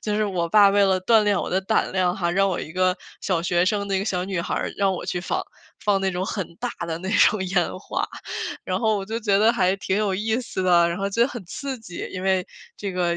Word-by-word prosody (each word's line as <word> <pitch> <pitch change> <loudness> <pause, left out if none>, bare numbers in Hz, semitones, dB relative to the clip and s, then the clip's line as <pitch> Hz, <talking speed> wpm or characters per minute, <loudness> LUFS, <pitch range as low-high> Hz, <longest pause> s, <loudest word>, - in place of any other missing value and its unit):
就 210 -1 -1
是 215 - +2
我 180 -4 -1
爸 200 +2 +6
为 200 0 +4
了 190 -1 +3
锻 225 +2 +5
炼 205 -2 +2
我 - - -3
的 185 - +1
胆 205 +3 0
量 185 -1 +1
哈， 170 -3 0
让 195 +3 +2
我 185 - -1
一 155 - -6
个 185 0 +2 0.2
小 175 -4 0
学 175 +1 +2
生， 200 +1 0
那 195 -1 0
个 195 - -2
小 180 -3 -1
女 190 -2 -2
孩， - - -2
让 195 -1 +3
我 - - -5
去 180 - -2
放， - - -2 0.4
放 205 -2 +3
那 190 0 +1
种 180 0 -2
很 190 -4 -4
大 245 +1 -3 0.2
的 165 -1 -3
那 190 +2 -5
种 205 -1 +4
烟 185 -1 0
花。 - - -3 0.6
然 - - -1
后 220 -2 +2
我 195 - -3
就 220 +3 -3
觉 205 -3 +2
得 220 +3 +5
还 190 -5 +2
挺 190 0 -1
有 205 -3 +1
意 220 +5 0
思 230 -6 -4
的， 175 -2 +4
然 170 - -2
后 195 0 -1
觉 230 - -1
得 245 - +3
很 240 -7 -7
刺 270 - -5
激， 180 -6 -7
因 185 - -5
为 190 -1 +1 0.3
这 200 -2 -4
个 175 -1 0
195 Hz, 285 characters per minute, -23 LUFS, 180-210 Hz, 0.6 s, 爸